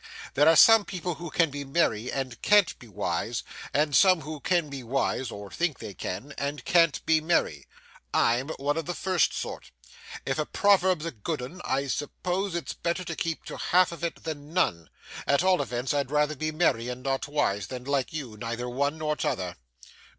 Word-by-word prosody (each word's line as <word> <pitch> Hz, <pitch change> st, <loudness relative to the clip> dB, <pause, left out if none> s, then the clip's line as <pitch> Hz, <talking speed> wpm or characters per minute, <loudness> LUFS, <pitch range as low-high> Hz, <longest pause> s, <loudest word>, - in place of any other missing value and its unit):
There 145 Hz, +3 st, +5 dB
are 165 Hz, -, +6 dB
some 225 Hz, +6 st, +8 dB
people 180 Hz, -2 st, -4 dB
who 170 Hz, +1 st, -7 dB
can 165 Hz, -1 st, +2 dB
be 145 Hz, 0 st, -5 dB
merry 135 Hz, -6 st, 0 dB
and 130 Hz, -3 st, -4 dB
can't 205 Hz, -5 st, +4 dB
be 120 Hz, -, -13 dB
wise, 105 Hz, -, -2 dB, 0.3 s
and 145 Hz, -1 st, +1 dB
some 185 Hz, -4 st, +6 dB
who 155 Hz, 0 st, -6 dB
can 170 Hz, +1 st, +1 dB
be 140 Hz, -2 st, -6 dB
wise 130 Hz, +1 st, -1 dB
(or 100 Hz, -3 st, -8 dB
think 170 Hz, -5 st, -1 dB
they 100 Hz, -, -8 dB
can) 100 Hz, +9 st, -5 dB
and 140 Hz, -2 st, -3 dB
can't 165 Hz, -3 st, +3 dB
be 160 Hz, -1 st, +4 dB
merry. 115 Hz, -, 0 dB, 0.4 s
I'm 120 Hz, +4 st, +2 dB
one 145 Hz, +3 st, -1 dB
of 165 Hz, -, -3 dB
the 175 Hz, -, -2 dB
first 185 Hz, -3 st, +2 dB
sort. -, -, -5 dB, 0.6 s
If 135 Hz, -, -1 dB
the 155 Hz, -, -1 dB
proverb's 190 Hz, -5 st, +3 dB
a 165 Hz, -, -2 dB
good 135 Hz, +7 st, -4 dB
'un, 170 Hz, +9 st, -8 dB
I 135 Hz, +1 st, 0 dB
suppose 180 Hz, +7 st, -2 dB
it's 170 Hz, -, -3 dB
better 170 Hz, +2 st, -2 dB
to 170 Hz, -2 st, -5 dB
keep 165 Hz, +1 st, -3 dB
to -, -, -7 dB
half 180 Hz, 0 st, +3 dB
of 170 Hz, 0 st, -9 dB
it 170 Hz, -, -3 dB
than 150 Hz, -2 st, -6 dB
none; 85 Hz, -, +1 dB, 0.4 s
at 140 Hz, +4 st, +3 dB
all 185 Hz, -1 st, +4 dB
events, 125 Hz, +2 st, -2 dB
I'd 140 Hz, -3 st, 0 dB
rather 150 Hz, +1 st, +1 dB
be 155 Hz, +2 st, -2 dB
merry 150 Hz, -7 st, +1 dB
and 125 Hz, +1 st, -6 dB
not 135 Hz, 0 st, -1 dB
wise, 145 Hz, -9 st, 0 dB
than 125 Hz, -1 st, -6 dB
like 140 Hz, -1 st, -1 dB
you, 135 Hz, -8 st, -6 dB
neither 115 Hz, +2 st, -4 dB
one 140 Hz, +5 st, -1 dB
nor 155 Hz, -1 st, -1 dB
t'other. 90 Hz, -9 st, -2 dB
145 Hz, 200 wpm, -27 LUFS, 130-170 Hz, 0.6 s, some